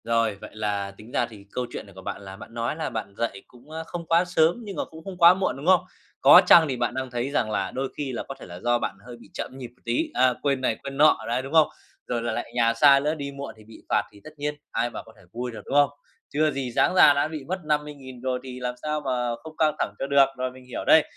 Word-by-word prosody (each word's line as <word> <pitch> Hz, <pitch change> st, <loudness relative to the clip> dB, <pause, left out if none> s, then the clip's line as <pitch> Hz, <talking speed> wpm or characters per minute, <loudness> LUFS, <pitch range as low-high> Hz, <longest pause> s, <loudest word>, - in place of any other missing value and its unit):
Rồi, 115 Hz, -2 st, +1 dB
vậy -, -, -8 dB
là 105 Hz, -2 st, -2 dB
tính 110 Hz, +3 st, -13 dB
ra 120 Hz, -, +1 dB
thì 105 Hz, -4 st, -13 dB
câu 125 Hz, -, -2 dB
chuyện -, -, -6 dB
này 100 Hz, -, -16 dB
của 95 Hz, -, -10 dB
bạn 95 Hz, -, -5 dB
là 95 Hz, -1 st, -9 dB
bạn 110 Hz, +3 st, -12 dB
nói 115 Hz, +4 st, -2 dB
là 160 Hz, -, -3 dB
bạn 105 Hz, -3 st, -5 dB
dậy 115 Hz, -4 st, -2 dB
cũng, 125 Hz, +4 st, -19 dB
ơ, 160 Hz, +1 st, -5 dB
không 170 Hz, -1 st, -6 dB
quá 165 Hz, +2 st, +3 dB
sớm 170 Hz, -1 st, +3 dB
nhưng 200 Hz, -3 st, -7 dB
mà -, -, -2 dB
cũng 160 Hz, 0 st, -13 dB
không 190 Hz, 0 st, -7 dB
quá 170 Hz, 0 st, +8 dB
muộn, 190 Hz, -6 st, -1 dB
đúng 140 Hz, -, -8 dB
không? 185 Hz, -1 st, +6 dB, 0.4 s
Có 180 Hz, -, +9 dB
chăng 165 Hz, -2 st, +8 dB
thì 130 Hz, -3 st, -2 dB
bạn 120 Hz, 0 st, -1 dB
đang 130 Hz, 0 st, -3 dB
thấy 120 Hz, +2 st, -2 dB
rằng 110 Hz, -6 st, 0 dB
là -, -, -1 dB
đôi 135 Hz, 0 st, -3 dB
khi 140 Hz, -3 st, -3 dB
là 120 Hz, -, -4 dB
có 135 Hz, -, -8 dB
thể -, -, -10 dB
là 90 Hz, 0 st, -9 dB
do 120 Hz, +3 st, +1 dB
bạn -, -, -3 dB
hơi 120 Hz, -1 st, -9 dB
bị 115 Hz, -, -17 dB
chậm 130 Hz, -, -6 dB
nhịp 130 Hz, -2 st, -6 dB
một 120 Hz, +1 st, -26 dB
tí, 120 Hz, +1 st, 0 dB
ờ, 125 Hz, 0 st, +3 dB
quên 140 Hz, -2 st, 0 dB
này 120 Hz, -3 st, +1 dB
quên 135 Hz, 0 st, -6 dB
nọ 155 Hz, +2 st, +6 dB
đấy, 120 Hz, +2 st, 0 dB
đúng 135 Hz, +3 st, -8 dB
không? 160 Hz, -2 st, +6 dB, 0.4 s
Rồi 120 Hz, -1 st, -1 dB
lại 120 Hz, -, -1 dB
lại -, -, -4 dB
nhà 115 Hz, -1 st, +3 dB
xa 140 Hz, +4 st, +6 dB
nữa, 150 Hz, +3 st, 0 dB
đi 140 Hz, -2 st, -5 dB
muộn 140 Hz, 0 st, -7 dB
thì 110 Hz, -, -15 dB
bị 110 Hz, +1 st, -15 dB
phạt 105 Hz, -, +3 dB
thì 100 Hz, -, -17 dB
tất 155 Hz, -, -10 dB
nhiên 150 Hz, +1 st, -2 dB, 0.2 s
ai 120 Hz, -, 0 dB
mà -, -, -7 dB
có 110 Hz, -, -17 dB
thể -, -, -19 dB
vui 125 Hz, +1 st, -4 dB
được, 115 Hz, -, -8 dB
đúng -, -, -6 dB
không? 145 Hz, -1 st, +6 dB, 0.4 s
Chưa 155 Hz, +1 st, +2 dB
gì 135 Hz, -3 st, -3 dB
sáng -, -, +3 dB
ra 145 Hz, -, +8 dB
đã 145 Hz, +1 st, +1 dB
bị 155 Hz, -3 st, -6 dB
mất 185 Hz, +2 st, -2 dB
50.000 145 Hz, -4 st, -3 dB
rồi 130 Hz, 0 st, -1 dB
thì 125 Hz, -1 st, -8 dB
làm 125 Hz, 0 st, -3 dB
sao 150 Hz, 0 st, -2 dB
mà 125 Hz, -3 st, -1 dB
không 160 Hz, 0 st, -11 dB
căng 155 Hz, -1 st, +2 dB
thẳng -, -, -1 dB
cho 135 Hz, -, -2 dB
được, 140 Hz, -1 st, +6 dB
rồi 130 Hz, 0 st, -2 dB
mình 130 Hz, 0 st, -15 dB
hiểu 125 Hz, -, -6 dB
đây. 160 Hz, -, +7 dB
130 Hz, 295 wpm, -25 LUFS, 120-150 Hz, 0.4 s, Có